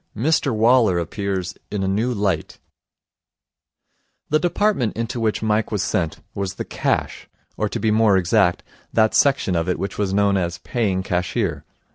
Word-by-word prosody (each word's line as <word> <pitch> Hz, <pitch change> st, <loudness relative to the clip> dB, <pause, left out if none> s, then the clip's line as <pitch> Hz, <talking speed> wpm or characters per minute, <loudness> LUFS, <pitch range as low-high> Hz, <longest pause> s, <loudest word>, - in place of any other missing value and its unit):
Mr 140 Hz, +3 st, +1 dB
Waller 115 Hz, -3 st, +4 dB
Appears 95 Hz, +1 st, -3 dB, 0.2 s
in 100 Hz, -2 st, -2 dB
a -, -, 0 dB
New 110 Hz, +6 st, 0 dB
Light 100 Hz, -8 st, -1 dB, 1.7 s
The 155 Hz, -, +3 dB
department 175 Hz, -, 0 dB
into 115 Hz, +1 st, -3 dB
which 110 Hz, -1 st, -1 dB
Mike 110 Hz, +1 st, 0 dB
was 105 Hz, -3 st, 0 dB
sent 80 Hz, -4 st, -2 dB
was 100 Hz, -2 st, -3 dB
the -, -, -5 dB
Cash, -, -, -2 dB, 0.3 s
or, -, -, -1 dB
to -, -, -3 dB
be 110 Hz, -, +1 dB
more 110 Hz, -2 st, +4 dB
exact, 95 Hz, 0 st, +2 dB, 0.3 s
that 110 Hz, -1 st, +3 dB
section 135 Hz, -10 st, +2 dB
of 85 Hz, +1 st, 0 dB
it 90 Hz, -, 0 dB
which 100 Hz, -, -5 dB
was 100 Hz, -2 st, 0 dB
known 100 Hz, 0 st, +2 dB
as 85 Hz, -1 st, -2 dB
Paying 95 Hz, -2 st, -1 dB
Cashier. 90 Hz, -4 st, -2 dB
100 Hz, 160 wpm, -21 LUFS, 95-115 Hz, 1.7 s, Waller